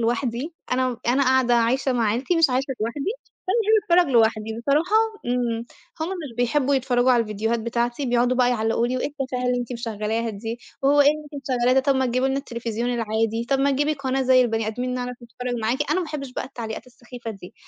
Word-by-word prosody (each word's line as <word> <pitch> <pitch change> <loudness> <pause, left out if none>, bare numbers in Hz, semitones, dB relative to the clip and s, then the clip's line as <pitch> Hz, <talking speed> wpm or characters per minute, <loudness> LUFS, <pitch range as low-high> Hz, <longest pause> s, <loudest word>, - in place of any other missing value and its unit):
لوحدي، 240 +6 -1 0.2
أنا 255 0 +2
م 240 - -5
أنا 260 +3 +3
قاعدة 260 -2 +3
عايشة 255 +3 +2
مع 235 -2 +1
عيلتي 255 +11 0
مش 330 -4 +4
عايشة 260 +2 0
لوحدي، 275 - -2 0.4
فانا 405 - +2 0.3
باحب 345 +1 +6
أتفرّج 310 -7 0
لوحدي 220 0 +2
بصراحة 305 - +2 0.3
إمم، 240 -2 -1 0.4
هُم 320 - -1
مش 325 -10 -6
بيحبوا 265 +3 +2
يتفرّجوا 255 -1 +2
على 240 - +4
الفيديوهات 225 +2 -1
بتاعتي 240 +3 -1
بيقعدوا 245 +1 +2
بقى 250 -1 +4
يعلقوا 225 0 +1
لي 255 +1 -1
وإيه - - -1
التفاهة 265 -3 -4
اللي 250 0 +1
أنتِ 245 +1 -5
مشغّلاها 225 -1 -2
دي، 225 +3 -5 0.2
وهو 285 +1 +5
إيه 285 - +6
اللي 305 +1 +3
أنتِ 280 - -6
مشغّلاها 245 0 +3
ده 265 - +5
طَب 275 +1 +2
ما 260 -1 +2
تجيبي 255 +2 +1
لنا 270 +1 0
التليفزيون 235 -2 -3
العادي 225 0 -1
طَب 275 - +3
ما 280 +1 +3
تجيبي 290 +3 +1
قناة 270 -2 -1
زي 255 0 +5
البني 225 -2 -1
آدمين 245 +3 -2
نعرف 250 0 -4
نتفرّج 245 +1 -5
معاكِ، 260 +7 0
أنا 370 - +2
ما 345 - -3
احبش 275 -4 -5
بقى - - -3
التعليقات 235 -3 -7
السخيفة 240 -1 -9
دي، 195 -4 -11
245 Hz, 215 wpm, -23 LUFS, 230-270 Hz, 0.4 s, باحب